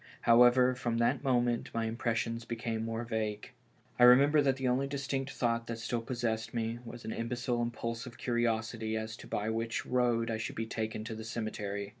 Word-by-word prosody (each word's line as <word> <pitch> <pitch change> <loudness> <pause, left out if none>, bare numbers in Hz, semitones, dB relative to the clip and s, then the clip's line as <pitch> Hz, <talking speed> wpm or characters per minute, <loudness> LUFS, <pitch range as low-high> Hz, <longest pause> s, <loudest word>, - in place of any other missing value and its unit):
However, 125 +2 +6
from 120 -2 -2
that 125 +4 +1
moment 120 -3 +1
my 115 0 0
impressions 115 0 -1
became 115 -1 -3
more 115 +1 -3
vague. 110 -2 -3 0.5
I - - +6
remember 140 +5 +7
that 135 -2 +2
the 135 -1 -2
only 130 +2 +1
distinct 135 -1 -2
thought 115 -2 -1
that 115 - -4
still 115 +1 -2
possessed 115 -2 -2
me 115 0 -2
was 120 0 -9
an - - -3
imbecile" 120 +1 -2
impulsive 115 0 -4
curiosity 115 -2 -1
as 110 +1 -4
to - - -11
by 105 +2 -1
which 115 +1 -2
road 120 -2 +1
I 110 - -1
should 110 - -4
be 115 - -2
taken 110 -1 -3
to 115 +1 -5
the 110 0 -7
cemetery. 105 -3 -4
115 Hz, 185 wpm, -32 LUFS, 115-125 Hz, 0.5 s, remember